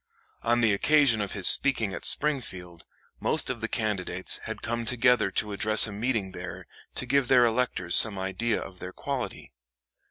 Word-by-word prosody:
On 120 Hz, +1 st, 0 dB
the 110 Hz, -3 st, +2 dB
occasion 135 Hz, 0 st, +2 dB
of 100 Hz, -, -5 dB
his 95 Hz, -3 st, 0 dB
speaking 115 Hz, -8 st, +3 dB
at 85 Hz, -, -6 dB
Springfield, 90 Hz, -, +1 dB, 0.3 s
most -, -, -1 dB
of 120 Hz, -3 st, -8 dB
the 115 Hz, -, -3 dB
candidates 100 Hz, -5 st, -1 dB
had 110 Hz, -, -8 dB
come 120 Hz, +1 st, -4 dB
together 125 Hz, -2 st, +1 dB
to 105 Hz, +2 st, -4 dB
address 110 Hz, +2 st, +2 dB
a 105 Hz, -, -6 dB
meeting 105 Hz, -2 st, -3 dB
there 90 Hz, -1 st, -10 dB, 0.3 s
to -, -, -2 dB
give 135 Hz, 0 st, 0 dB
their 125 Hz, -1 st, +4 dB
electors 115 Hz, -7 st, +1 dB
some 110 Hz, -3 st, +5 dB
idea 95 Hz, +5 st, -3 dB
of 90 Hz, -1 st, -11 dB
their 90 Hz, 0 st, -9 dB
quality. 140 Hz, -3 st, -7 dB
110 Hz, 170 wpm, -25 LUFS, 95-125 Hz, 0.3 s, some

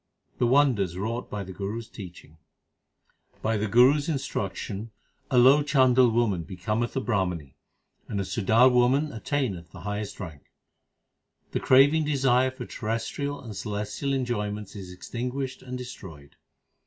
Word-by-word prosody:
The 120 Hz, -, +3 dB
wonders 120 Hz, -10 st, +3 dB
wrought 115 Hz, +5 st, -3 dB
by 105 Hz, -1 st, -4 dB
the 95 Hz, 0 st, -9 dB
Guru 100 Hz, +4 st, -4 dB
s 115 Hz, -2 st, -7 dB
teaching: 85 Hz, -5 st, -11 dB, 1.0 s
By 110 Hz, +1 st, +1 dB
the 105 Hz, +1 st, -1 dB
Guru 125 Hz, +7 st, +6 dB
s 145 Hz, +2 st, -3 dB
instruction, 110 Hz, -, -3 dB, 0.4 s
a 130 Hz, -, +2 dB
low 135 Hz, +4 st, +7 dB
Chandal 130 Hz, -4 st, +4 dB
woman 110 Hz, -6 st, +1 dB
becometh 105 Hz, +7 st, -3 dB
a -, -, +1 dB
Brahmani 90 Hz, -, -2 dB, 0.5 s
and 100 Hz, -, -3 dB
a -, -, 0 dB
Sudar 115 Hz, +5 st, +4 dB
woman 130 Hz, +5 st, +3 dB
attaineth 110 Hz, -, -2 dB
the -, -, -12 dB
highest 105 Hz, 0 st, -4 dB
rank; 80 Hz, -6 st, -8 dB, 1.1 s
The -, -, -1 dB
craving 145 Hz, +4 st, +5 dB
desire 130 Hz, -3 st, +3 dB
2 130 Hz, -, -13 dB
for -, -, -6 dB
terrestrial 120 Hz, +6 st, -3 dB
and 110 Hz, -4 st, -8 dB
celestial 105 Hz, +7 st, -3 dB
enjoy 120 Hz, -6 st, -1 dB
ments 105 Hz, 0 st, -7 dB
is 95 Hz, -3 st, -8 dB
extinguished 125 Hz, +7 st, -5 dB
and 125 Hz, 0 st, -6 dB
destroyed. 90 Hz, -, -10 dB
115 Hz, 150 wpm, -26 LUFS, 100-130 Hz, 1.1 s, low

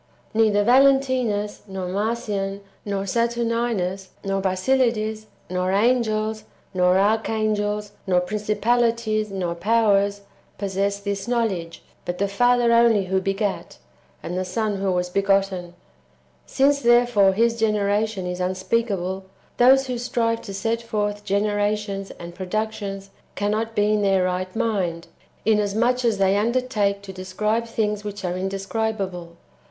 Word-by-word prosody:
Neither 215 Hz, -2 st, +3 dB
Valentinus, 255 Hz, -4 st, +3 dB
nor 190 Hz, -2 st, -5 dB
Marcion, 200 Hz, -1 st, -2 dB, 0.2 s
nor 200 Hz, -1 st, -2 dB
Saturninus, 230 Hz, -3 st, -1 dB, 0.2 s
nor 195 Hz, 0 st, -1 dB
Basilides, 215 Hz, +2 st, 0 dB, 0.2 s
nor 185 Hz, +1 st, -1 dB
angels, 215 Hz, 0 st, +1 dB, 0.3 s
nor 180 Hz, 0 st, +3 dB
arch 215 Hz, +3 st, +2 dB
angels, 210 Hz, -1 st, -1 dB, 0.2 s
nor 180 Hz, -1 st, +3 dB
princij^alities, 215 Hz, +2 st, 0 dB
nor 185 Hz, -3 st, -2 dB
powers 200 Hz, +1 st, +2 dB, 0.4 s
[possess 200 Hz, 0 st, -1 dB
this 200 Hz, 0 st, -4 dB
knowledge], 205 Hz, -9 st, -2 dB, 0.2 s
but 175 Hz, -, -4 dB
the 200 Hz, -, +1 dB
Father 240 Hz, +3 st, +3 dB
only 230 Hz, -4 st, +4 dB
who 190 Hz, +1 st, 0 dB
begat, 195 Hz, +1 st, -2 dB, 0.5 s
and 180 Hz, -, -4 dB
the 185 Hz, -, -1 dB
Son 205 Hz, +2 st, -2 dB
who 195 Hz, 0 st, 0 dB
was 180 Hz, 0 st, -1 dB
be 200 Hz, -, +1 dB
gotten. 195 Hz, -3 st, 0 dB, 0.7 s
Since 280 Hz, +1 st, +2 dB
therefore 240 Hz, -5 st, +4 dB
His 230 Hz, +3 st, +2 dB
generation 210 Hz, -2 st, 0 dB
is 180 Hz, 0 st, -4 dB
unspeakable, 190 Hz, 0 st, -1 dB, 0.3 s
those 265 Hz, +2 st, +6 dB
who 250 Hz, -2 st, -3 dB
strive 230 Hz, -1 st, 0 dB
to 200 Hz, -, -8 dB
set 225 Hz, +3 st, -1 dB
forth 210 Hz, -2 st, -2 dB
generations 205 Hz, 0 st, -1 dB
and 170 Hz, 0 st, -9 dB
productions 195 Hz, +1 st, -4 dB, 0.2 s
cannot 215 Hz, +2 st, -1 dB
be 210 Hz, +1 st, +2 dB
in 210 Hz, -, +1 dB
their 195 Hz, -2 st, +3 dB
right 185 Hz, +1 st, -2 dB
mind, 180 Hz, -7 st, -1 dB, 0.4 s
inasmuch 220 Hz, +4 st, +2 dB
as 230 Hz, -3 st, +2 dB
they 195 Hz, 0 st, +3 dB
undertake 215 Hz, -3 st, 0 dB
to 190 Hz, -1 st, -8 dB
describe 210 Hz, +5 st, -2 dB
things 210 Hz, -2 st, -1 dB
which 205 Hz, -2 st, -6 dB
are 180 Hz, 0 st, -1 dB
indescribable. 195 Hz, -2 st, -3 dB
205 Hz, 130 wpm, -23 LUFS, 195-225 Hz, 0.7 s, those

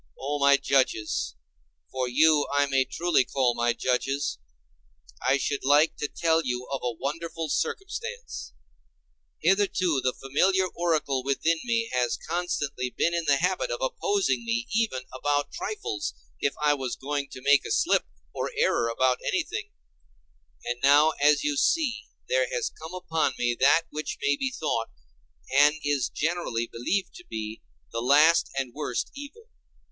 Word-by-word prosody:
O 145 Hz, +2 st, -2 dB
my 140 Hz, 0 st, +6 dB
judges—for 105 Hz, -, -2 dB
you 150 Hz, +3 st, +4 dB
I 145 Hz, 0 st, +3 dB
may 135 Hz, -2 st, +2 dB
truly 170 Hz, +2 st, +1 dB
call 130 Hz, -2 st, +1 dB, 0.2 s
judges—I 70 Hz, -, -3 dB
should 140 Hz, +1 st, -2 dB
like 145 Hz, +4 st, +4 dB
to 150 Hz, -, -2 dB
tell 165 Hz, +1 st, +1 dB
you 125 Hz, -1 st, -3 dB
of 135 Hz, -, -2 dB
a 125 Hz, -, -1 dB
wonderful 165 Hz, +2 st, -4 dB
circumstance. 465 Hz, -, -4 dB, 0.9 s
Hitherto 185 Hz, -6 st, +2 dB
the 130 Hz, 0 st, 0 dB
familiar 185 Hz, +8 st, +2 dB
oracle 155 Hz, -7 st, 0 dB
within 160 Hz, +5 st, +1 dB
me 230 Hz, -1 st, 0 dB
has 125 Hz, -1 st, +1 dB
constantly 150 Hz, -6 st, -2 dB
been 170 Hz, +7 st, 0 dB
in 170 Hz, -1 st, -1 dB
the 145 Hz, -, +5 dB
habit 185 Hz, -, 0 dB
of -, -, -3 dB
opposing 410 Hz, -, 0 dB
me 235 Hz, +1 st, -1 dB
even 220 Hz, -, +1 dB
about 145 Hz, +2 st, -1 dB
trifles, 110 Hz, -, -4 dB, 0.2 s
if 140 Hz, -, 0 dB
I 150 Hz, 0 st, +3 dB
was 130 Hz, -3 st, -3 dB
going 140 Hz, 0 st, -3 dB
to 130 Hz, -, -9 dB
make 140 Hz, -1 st, +5 dB
a -, -, -6 dB
slip -, -, +2 dB, 0.3 s
or -, -, -2 dB
error 115 Hz, -, +2 dB
about 125 Hz, +2 st, +1 dB
anything; -, -, -2 dB, 1.0 s
and 120 Hz, 0 st, -3 dB
now 145 Hz, +3 st, +6 dB
as 145 Hz, 0 st, +4 dB
you 145 Hz, -1 st, 0 dB
see 295 Hz, -, +1 dB, 0.2 s
there -, -, +1 dB
has 480 Hz, -2 st, -1 dB
come 160 Hz, +3 st, -9 dB
upon 165 Hz, -3 st, 0 dB
me 120 Hz, 0 st, +1 dB
that 145 Hz, +5 st, +5 dB
which 155 Hz, -1 st, -4 dB
may 140 Hz, 0 st, +2 dB
be 265 Hz, -, -1 dB
thought, 150 Hz, -, -2 dB, 0.7 s
and 145 Hz, +2 st, +6 dB
is 145 Hz, -3 st, +1 dB
generally 155 Hz, -8 st, -1 dB
believed 175 Hz, +12 st, -2 dB
to -, -, -12 dB
be, 110 Hz, 0 st, -5 dB, 0.3 s
the 115 Hz, -, -3 dB
last 150 Hz, +6 st, +5 dB
and 130 Hz, -3 st, -2 dB
worst 145 Hz, -5 st, -3 dB
evil. 290 Hz, +11 st, -10 dB
145 Hz, 150 wpm, -26 LUFS, 130-175 Hz, 1.0 s, my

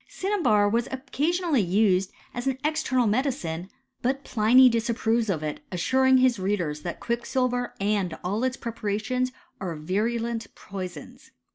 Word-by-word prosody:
Cinnabar 285 Hz, -, +2 dB
was 230 Hz, +3 st, +1 dB
occasionally 300 Hz, +3 st, 0 dB
used 190 Hz, 0 st, +2 dB, 0.2 s
as 245 Hz, +2 st, -4 dB
an 265 Hz, -1 st, 0 dB
eii^temal 300 Hz, -6 st, +1 dB
medicine; 205 Hz, -, -1 dB, 0.3 s
but 270 Hz, +3 st, 0 dB
Pliny 245 Hz, +3 st, +6 dB
disapproves 230 Hz, -1 st, +1 dB
of 160 Hz, -5 st, -1 dB
it, 150 Hz, -1 st, -3 dB
assuring 260 Hz, +8 st, +3 dB
hif 255 Hz, -4 st, +3 dB
readers 175 Hz, -7 st, -1 dB
that 170 Hz, -, -5 dB
quicksilver 245 Hz, +1 st, -1 dB
and 195 Hz, -4 st, 0 dB
all 205 Hz, +6 st, -1 dB
its 260 Hz, 0 st, 0 dB
preparations 230 Hz, +3 st, -2 dB, 0.3 s
are 180 Hz, -4 st, -4 dB
virulent 225 Hz, +8 st, -1 dB
poisons. 200 Hz, +9 st, -8 dB
230 Hz, 130 wpm, -26 LUFS, 195-255 Hz, 0.3 s, Pliny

